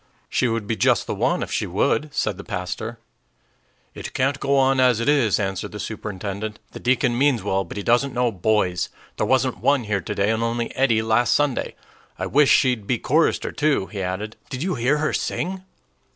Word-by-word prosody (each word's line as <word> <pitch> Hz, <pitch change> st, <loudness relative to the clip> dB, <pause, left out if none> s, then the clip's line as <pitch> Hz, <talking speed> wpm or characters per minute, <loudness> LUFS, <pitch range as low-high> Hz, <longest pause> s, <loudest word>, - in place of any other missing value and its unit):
"She 130 Hz, -, +1 dB
would 115 Hz, -2 st, -1 dB
be 110 Hz, -, -1 dB
just -, -, +2 dB
the -, -, -3 dB
one -, -, 0 dB
if -, -, -7 dB
she -, -, -1 dB
would," 150 Hz, +6 st, 0 dB
said -, -, -1 dB
the -, -, -8 dB
pastor. 110 Hz, +6 st, -5 dB, 1.0 s
"It -, -, -8 dB
can't 135 Hz, +2 st, +1 dB
go 140 Hz, 0 st, +1 dB
on 135 Hz, 0 st, +3 dB
as 125 Hz, -3 st, +4 dB
it 115 Hz, -, -2 dB
is," 135 Hz, -8 st, +3 dB
answered 95 Hz, -1 st, -3 dB
the 105 Hz, -, -6 dB
superintendent. 105 Hz, 0 st, -5 dB
"The -, -, -9 dB
deacon 125 Hz, -1 st, +1 dB
means 130 Hz, -4 st, +2 dB
well, 95 Hz, -1 st, 0 dB
but 90 Hz, -, -9 dB
he 100 Hz, -, -3 dB
doesn't 125 Hz, +5 st, +2 dB
know 125 Hz, -1 st, +2 dB
boys. 95 Hz, -2 st, 0 dB, 0.3 s
There -, -, 0 dB
wasn't 130 Hz, -1 st, +1 dB
one 140 Hz, -3 st, +2 dB
here 105 Hz, -2 st, -1 dB
today, 100 Hz, +2 st, 0 dB
and 110 Hz, 0 st, -1 dB
only 115 Hz, 0 st, -2 dB
Eddie 115 Hz, -5 st, +2 dB
last 110 Hz, +2 st, +3 dB
Sunday. 145 Hz, -3 st, 0 dB, 0.4 s
I -, -, -3 dB
wish 145 Hz, 0 st, +4 dB
she'd 125 Hz, -6 st, +3 dB
be 125 Hz, -, +1 dB
chorister, 155 Hz, +8 st, +1 dB
too," 150 Hz, -9 st, +1 dB
he 100 Hz, -, -4 dB
added. 95 Hz, +4 st, -4 dB
"Did 130 Hz, 0 st, -4 dB
you 185 Hz, 0 st, -1 dB
hear 130 Hz, +5 st, +1 dB
her 155 Hz, +1 st, 0 dB
sing?" 185 Hz, +1 st, -2 dB
120 Hz, 200 wpm, -23 LUFS, 105-135 Hz, 1.0 s, as